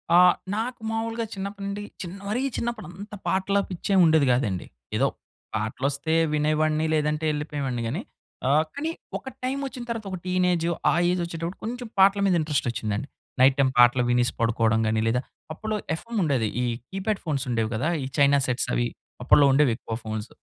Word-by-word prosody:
ఆ! -, -, +8 dB, 0.4 s
నాకు 230 Hz, +2 st, -3 dB
మావులుగా 225 Hz, +1 st, -2 dB
చిన్నప్పటి 200 Hz, 0 st, -5 dB
నుండి 200 Hz, +1 st, -4 dB, 0.2 s
చిన్ 175 Hz, -1 st, -6 dB
మరీ 220 Hz, +5 st, 0 dB, 0.2 s
చిన్నప్పుడంతా 210 Hz, -3 st, -5 dB
పాటల 190 Hz, +1 st, +1 dB
పిచ్చేమివుండేది 170 Hz, -5 st, +3 dB
కాదండి. 105 Hz, -8 st, -1 dB, 0.3 s
ఏదో -, -, +3 dB, 0.5 s
పాటలు 110 Hz, +5 st, -2 dB
వస్తే 145 Hz, +3 st, -2 dB, 0.2 s
వినేవాడిని 155 Hz, +1 st, +2 dB
లేదంటే 150 Hz, 0 st, +1 dB
ఎళ్ళిపోయేవాడిని 145 Hz, -5 st, -3 dB
గాని 145 Hz, -, -2 dB, 0.5 s
ఆహ్, 150 Hz, +3 st, +4 dB
కానీ 305 Hz, +3 st, -2 dB, 0.3 s
ఒక -, -, -14 dB, 0.2 s
టైమ్ 265 Hz, +2 st, -1 dB
వచ్చిన 260 Hz, -2 st, -6 dB
తర్వాత 230 Hz, -2 st, -3 dB
ఒక 185 Hz, -, -3 dB
టీనేజ్ 180 Hz, -2 st, +1 dB, 0.3 s
ఆ -, -, +2 dB, 0.2 s
ఏజ్ 180 Hz, 0 st, 0 dB
వచ్చేటప్పుడు 170 Hz, +1 st, -5 dB
కొంచెం 245 Hz, +2 st, -4 dB
పాటల 195 Hz, +1 st, +6 dB
మీద 190 Hz, -2 st, +3 dB
ఇంట్రెస్ట్ 150 Hz, -4 st, 0 dB
వచ్చిందండి. 110 Hz, +1 st, -3 dB, 0.3 s
నైట్ 130 Hz, +1 st, +6 dB
టైమ్ 135 Hz, -1 st, +4 dB
పాటలు 120 Hz, +1 st, +6 dB
వినేసి 120 Hz, 0 st, +2 dB
పడుకోవడం 115 Hz, -1 st, +2 dB
గాని 110 Hz, 0 st, +1 dB
లేదా 125 Hz, +2 st, +2 dB, 0.3 s
అప్పల్లో 215 Hz, +6 st, -3 dB, 0.2 s
ఎఫ్ఎమ్ 230 Hz, +6 st, -4 dB
ఉండేది. 135 Hz, -8 st, +1 dB, 0.2 s
ఈ -, -, +1 dB, 0.2 s
కీప్యాడ్ 195 Hz, +2 st, -2 dB
ఫోన్స్ 145 Hz, -5 st, -1 dB
ఉండేవి 115 Hz, -2 st, 0 dB
కదా! 135 Hz, +9 st, 0 dB
ఈ -, -, -3 dB
చైనా 140 Hz, 0 st, +5 dB
సెట్స్ 125 Hz, -1 st, 0 dB
అవి -, -, +1 dB, 0.4 s
అప్పల్లో 145 Hz, -, +6 dB
ఉండేవి 140 Hz, -2 st, +4 dB
ఎక్కువ 115 Hz, -1 st, -6 dB
ఫోన్స్. 110 Hz, 0 st, -4 dB
155 Hz, 165 wpm, -25 LUFS, 125-200 Hz, 0.5 s, ఆ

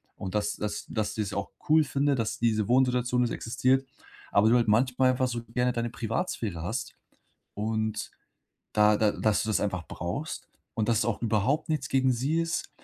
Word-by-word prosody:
und 95 Hz, +2 st, -6 dB
dass 105 Hz, 0 st, 0 dB
dass 105 Hz, 0 st, -4 dB
dass 110 Hz, -2 st, -2 dB
du 110 Hz, -, -1 dB
es 100 Hz, -1 st, -3 dB
auch 100 Hz, 0 st, -3 dB, 0.2 s
cool 155 Hz, 0 st, +6 dB
finde, 140 Hz, 0 st, +1 dB
dass 115 Hz, -3 st, -2 dB
diese 110 Hz, -3 st, +1 dB
Wohnsituation 125 Hz, 0 st, +2 dB
es 120 Hz, -, -1 dB
existiert, 130 Hz, +3 st, +1 dB, 0.5 s
aber 105 Hz, +2 st, +4 dB
du 120 Hz, -, +5 dB
halt 120 Hz, -, +1 dB
manchmal 130 Hz, +3 st, +3 dB
einfach 130 Hz, 0 st, +1 dB
so 120 Hz, -1 st, -4 dB
gerne 125 Hz, +1 st, 0 dB
deine 120 Hz, -1 st, -2 dB
Privatsphäre 115 Hz, -, -3 dB
hast 110 Hz, +8 st, -4 dB, 0.6 s
und 110 Hz, +1 st, -2 dB, 0.6 s
da 105 Hz, 0 st, +5 dB
da 105 Hz, -1 st, +2 dB
dass 110 Hz, -1 st, +1 dB
du 110 Hz, -, -2 dB
das 110 Hz, -, +2 dB
einfach 95 Hz, -4 st, -2 dB
brauchst. 115 Hz, -, -5 dB, 0.3 s
Und 110 Hz, -2 st, -1 dB
dass 115 Hz, -1 st, +3 dB
es -, -, +1 dB
auch 115 Hz, -, -1 dB
überhaupt 115 Hz, -, +1 dB
nichts 140 Hz, -4 st, -1 dB
gegen 130 Hz, -1 st, +3 dB
sie 140 Hz, +7 st, 0 dB
ist, 165 Hz, 0 st, -2 dB
115 Hz, 190 wpm, -28 LUFS, 105-130 Hz, 0.6 s, cool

